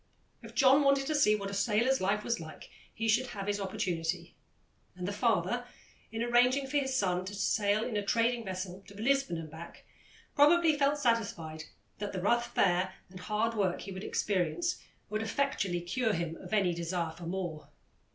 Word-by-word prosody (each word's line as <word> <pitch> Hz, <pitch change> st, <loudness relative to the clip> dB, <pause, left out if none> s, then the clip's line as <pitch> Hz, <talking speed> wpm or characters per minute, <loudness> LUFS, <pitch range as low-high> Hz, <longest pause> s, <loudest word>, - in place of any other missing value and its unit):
If -, -, -12 dB
John 270 Hz, +1 st, +6 dB
wanted 275 Hz, -1 st, +3 dB
to 310 Hz, -, -1 dB
see 275 Hz, -8 st, +4 dB
what 200 Hz, -1 st, -4 dB
a -, -, -6 dB
sailor's 235 Hz, +6 st, +2 dB
life 205 Hz, +3 st, +1 dB
was 235 Hz, -1 st, -1 dB
like, 160 Hz, -1 st, -10 dB, 0.2 s
he 225 Hz, 0 st, -3 dB
should 240 Hz, +4 st, +3 dB
have 200 Hz, -4 st, -6 dB
his 205 Hz, 0 st, -1 dB
opportunity, 185 Hz, -4 st, -2 dB, 0.6 s
and 180 Hz, 0 st, -5 dB
the -, -, -1 dB
father, 240 Hz, +2 st, +1 dB, 0.5 s
in 225 Hz, +1 st, -2 dB
arranging 245 Hz, +3 st, +3 dB
for 280 Hz, +2 st, -1 dB
his 265 Hz, -2 st, 0 dB
son 185 Hz, -6 st, +1 dB
to 205 Hz, +2 st, -6 dB
sail 205 Hz, +1 st, +1 dB
in 230 Hz, -, -3 dB
a 205 Hz, -, 0 dB
trading 235 Hz, +3 st, +1 dB
vessel 185 Hz, -1 st, -5 dB
to 200 Hz, +1 st, -12 dB
Lisbon 270 Hz, -5 st, +1 dB
and 160 Hz, -2 st, -7 dB
back, 160 Hz, +2 st, -11 dB, 0.5 s
probably 315 Hz, +2 st, +5 dB
felt 290 Hz, 0 st, +2 dB
satisfied 200 Hz, -, -1 dB, 0.3 s
that 205 Hz, 0 st, -4 dB
the 190 Hz, -, -2 dB
rough 235 Hz, +5 st, +1 dB
fare 185 Hz, 0 st, +2 dB, 0.2 s
and 185 Hz, -, -10 dB
hard 215 Hz, +4 st, 0 dB
work 195 Hz, -5 st, 0 dB
he 195 Hz, -, -7 dB
would 190 Hz, +1 st, -6 dB
experience 205 Hz, -, -1 dB, 0.3 s
would 215 Hz, +1 st, -1 dB
effectually 220 Hz, -7 st, -1 dB
cure 220 Hz, +6 st, 0 dB
him 165 Hz, -2 st, -2 dB
of -, -, -11 dB
any 195 Hz, -5 st, +2 dB
desire 170 Hz, 0 st, -2 dB
for 165 Hz, +1 st, -9 dB
more. 175 Hz, -4 st, -4 dB
210 Hz, 185 wpm, -31 LUFS, 185-245 Hz, 0.6 s, John